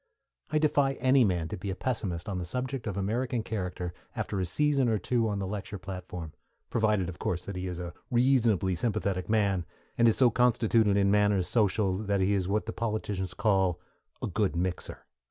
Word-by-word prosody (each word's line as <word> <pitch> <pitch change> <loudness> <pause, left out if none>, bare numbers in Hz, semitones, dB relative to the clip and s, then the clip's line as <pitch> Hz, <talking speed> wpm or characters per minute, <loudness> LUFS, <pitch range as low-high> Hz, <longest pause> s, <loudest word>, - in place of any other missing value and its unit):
I 155 - +1
defy 145 -3 +3
any 130 0 +4
man 90 -6 +1
to - - -4
be 95 +3 -5
a 95 - -2
pessimist 100 -10 -3
on 95 -3 -2
the - - -3
subject 125 +6 -4
of 100 -2 -3
American 115 +4 -1
character 90 -5 -4 0.2
after 100 - -2
a 90 - -1
season 140 - +2
or 110 - +2
two 115 +4 0
on 100 - -1
the 100 - -2
lecture 100 +1 -5
platform; 90 -4 -7 0.4
provided 105 -5 +2
of 90 - -7
course 90 0 -2
that 100 - -5
he 90 0 -3
is 90 -1 -4
a 85 -1 -6 0.2
reasonably 120 -7 +3
sympathetic 100 -3 -1
man, 100 -4 +2 0.4
and 115 - +6
is 115 - +3
so 125 -3 +5
constituted 115 -4 +3
in 100 0 +3
matters 105 -3 +3
social 100 -3 +1
that 100 -2 0
he 95 +2 +2
is 95 -3 0
what 105 +2 0
the 115 - -4
politicians 105 -4 -3
call 95 -5 +2 0.4
a - - 0
"good 100 -1 0
mixer." 90 +1 -3
100 Hz, 195 wpm, -29 LUFS, 95-115 Hz, 0.4 s, and